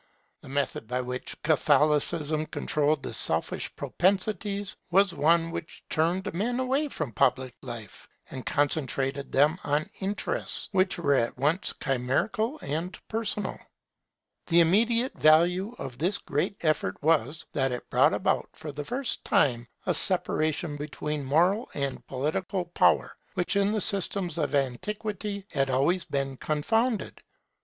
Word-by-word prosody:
The - - -12
method 140 -5 -2
by 125 +2 -1
which 125 0 -5
Catholicism 150 +1 +2
controlled 150 -1 0
the - - -5
selfish - - +2
propensities 200 +1 0
was 195 +1 +4
one 165 +2 +2
which 170 0 -7
turned 170 +4 0
men 235 +8 -1
away 265 +4 +1
from 145 - -4
public 125 +3 +1
life, 120 -6 -9 0.2
and 130 -2 -6
concentrated 140 -1 -1
them 150 +6 +3
on 145 +2 -1
interests 200 +2 -2
which 190 -1 +2
were 145 -5 +2
at 120 -3 0
once 150 +8 +1
chimerical 200 - 0
and 165 +6 -3
personal. 215 -3 -2 0.9
The 170 0 +5
immediate 230 +8 +3
value 175 +8 +4
of 125 -2 -7
this 185 +6 +1
great 175 +8 -2
effort 155 -2 0
was, 155 -1 +1
that 135 -3 +1
it 125 - -5
brought - - +4
about - - 0
for 155 -1 -7
the 145 +1 -5
first 250 - -2
time 120 -4 +2 0.2
a - - +2
separation 155 -1 0
between 150 0 -4
moral 175 - +2
and 140 -2 -3
political 175 +8 -2
power, 175 - +2 0.2
which 180 +2 0
in 200 0 +3
the 215 -1 0
systems 190 -4 +1
of 145 -2 0
antiquity 200 - -2
had 135 -1 0
always 145 +8 +2
been 135 -1 -2
confounded. 225 - -1
160 Hz, 135 wpm, -27 LUFS, 140-195 Hz, 0.9 s, The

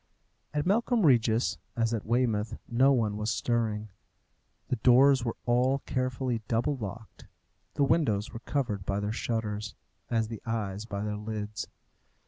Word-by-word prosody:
At 150 0 -1
Melcombe 225 +2 +2
Regis, 110 - +3 0.2
as 115 0 +1
at 110 -2 -3
Weymouth, 115 -2 +1
no 130 +4 +4
one 110 -6 +1
was 105 +1 -2
stirring. 110 -2 -1 0.8
The 125 - 0
doors 130 +3 +5
were 115 -2 -2
all 125 +3 +2
carefully 130 -2 -1
double 120 +5 +1
locked, 115 -1 -8 0.5
The 145 - +2
windows 120 -9 +1
were 115 - -6
covered 120 -6 -2
by 100 +1 -1
their 105 +1 -2
shutters, 105 -3 -3 0.3
as 115 -2 +1
the 110 -2 -7
eyes 105 -3 -3
by 100 -2 -4
their 105 0 -2
lids. 105 -1 -4
115 Hz, 145 wpm, -29 LUFS, 105-125 Hz, 0.8 s, doors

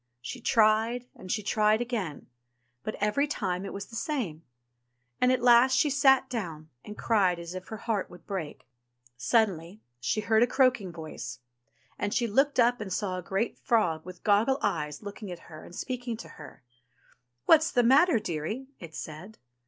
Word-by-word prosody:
She 245 - -7
tried 225 +2 +3
and 185 - -8
she 210 - -1
tried 215 +1 +3
again, 225 - -3 0.6
but 215 - -4
every 210 +8 +1
time 190 -9 -2
it - - -6
was 200 0 -6
the 230 - -12
same; 230 - -3 0.8
and 250 - +4
at 255 -2 0
last 250 +2 +6
she 295 +1 +3
sate 270 -2 +4
down 165 -11 -5
and 210 - -9
cried 195 -6 +2
as 170 +1 -7
if 185 0 -7
her 220 - -6
heart 215 -3 -2
would 175 -2 -14
break. 185 -7 -6 0.5
Suddenly 180 - 0 0.2
she 165 - -1
heard 220 +1 +3
a 240 - +5
croaking 255 -9 +2
voice, 155 -7 -7 0.6
and 205 0 -1
she 240 - +2
looked 270 +6 +2
up 240 0 +4
and 200 -3 -5
saw 185 -1 -2
a - - -6
great 195 +6 -2
frog 170 -9 +1
with 180 0 -11
goggle 215 +6 +3
eyes 150 0 -2
looking 205 0 -7
at 175 - -6 0.2
her 155 - -10
and 175 - -12
speaking 245 -1 -4
to - - -10
her. - - -13 0.8
What's 315 0 +6
the 245 - +2
matter, 270 +4 +5
dearie 210 - -4
?" - - -46
it 165 -2 -10
said. 165 +8 -8
215 Hz, 180 wpm, -28 LUFS, 180-245 Hz, 0.8 s, last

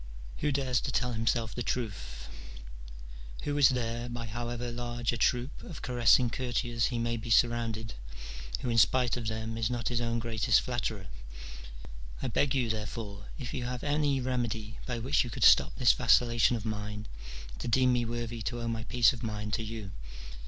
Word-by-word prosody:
Who 150 - 0
dares 130 -3 +1
to - - -3
tell 125 -1 0
himself 115 0 0
the 120 - -4
truth? 80 - -4 1.2
Who 145 - -1
is 135 - +8
there, 120 -1 -2
by 120 -1 -5
however 120 +2 -4
large 120 0 -2
a - - 0
troop 125 +4 0
of 165 - -9
caressing 120 -1 +4
courtiers 120 -2 -1
he 120 - -3
may 115 0 -1
be 115 +1 -7
surrounded, 115 -1 +2 0.7
who 125 - -1
in 115 - +4
spite 125 +1 +4
of 120 -3 -4
them 110 +1 -3
is 115 0 +1
not 120 -1 -2
his 120 -1 0
own 115 0 0
greatest 115 -1 +2
flatterer? 115 -5 -3 1.1
I - - -2
beg 140 -1 +1
you, 125 -3 +1
therefore, 105 -1 -5
if 125 -3 -6
you 125 - -3
have 125 0 -4
any 145 -2 +1
remedy 120 -4 -2
by 125 -2 -2
which 130 +5 +2
you 120 - -6
could - - -3
stop 65 - +6
this 125 -2 +5
vacillation 120 0 +4
of 110 -1 -5
mine, 105 0 -4 0.5
to - - -5
deem 125 +2 +4
me 120 -1 +2
worthy 115 0 -4
to 120 +3 -3
owe 115 - -3
my 115 -1 -3
peace 125 +1 +4
of 120 - -8
mind 105 -2 -4
to 115 - 0
you. 110 -3 -6
120 Hz, 185 wpm, -30 LUFS, 115-125 Hz, 1.2 s, is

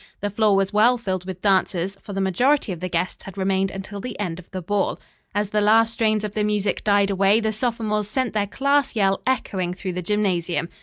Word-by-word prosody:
The 205 0 -2
floor 210 0 +3
was 195 +1 +1
well 230 +4 +5
filled 185 -6 -3
with 185 -1 -7
dancers, 190 -1 +1
for - - -9
the 195 - -3
majority 245 +7 +2
of 175 - -5
the 185 +1 -4
guests 175 +1 -2
had 195 0 -10
remained 195 0 +1
until 195 +1 -7
the 240 +1 -7
end 180 -4 -3
of 180 - -14
the 190 - -5
ball. 195 +3 -1 0.4
As 205 0 0
the 210 - +2
last 225 +2 +4
strains 215 -2 +1
of 210 -1 -4
the 210 - 0
music 210 -1 0
died 200 -1 +3
away 195 +2 +3
the 220 -1 -1
sophomores 215 -2 -1
sent 255 0 -1
their 205 -1 0
class 280 +4 +1
yell 195 -2 +2
echoing 190 -8 -1
through 185 -1 -4
the 180 - -3
gymnasium. 180 -3 0
205 Hz, 220 wpm, -23 LUFS, 190-215 Hz, 0.4 s, well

